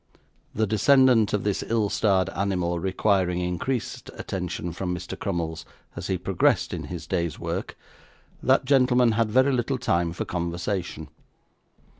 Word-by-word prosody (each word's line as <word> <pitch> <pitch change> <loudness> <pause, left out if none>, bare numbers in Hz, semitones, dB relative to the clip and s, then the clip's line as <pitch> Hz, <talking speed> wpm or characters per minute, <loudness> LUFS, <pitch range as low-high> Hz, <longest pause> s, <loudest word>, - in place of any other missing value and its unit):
The 110 - +2
descendant 115 +1 +4
of 105 - 0
this 105 -2 0
ill 110 -2 +1
starred 95 -3 +2
animal 90 -3 -1
requiring 95 -1 +1
increased 100 +8 -3
attention 90 -2 -4
from 90 0 -3
Mr. 90 +2 -6
Crummles 85 -4 -3 0.3
as - - -5
he - - 0
progressed - - +1
in - - -4
his 90 -2 -7
day's 85 -4 -2
work, - - -4 0.6
that 130 0 +3
gentleman 125 -3 +4
had 110 0 +1
very 130 +5 +4
little 130 +2 0
time 85 -8 0
for 85 - -4
conversation. 85 -1 -3
95 Hz, 140 wpm, -25 LUFS, 90-115 Hz, 0.6 s, descendant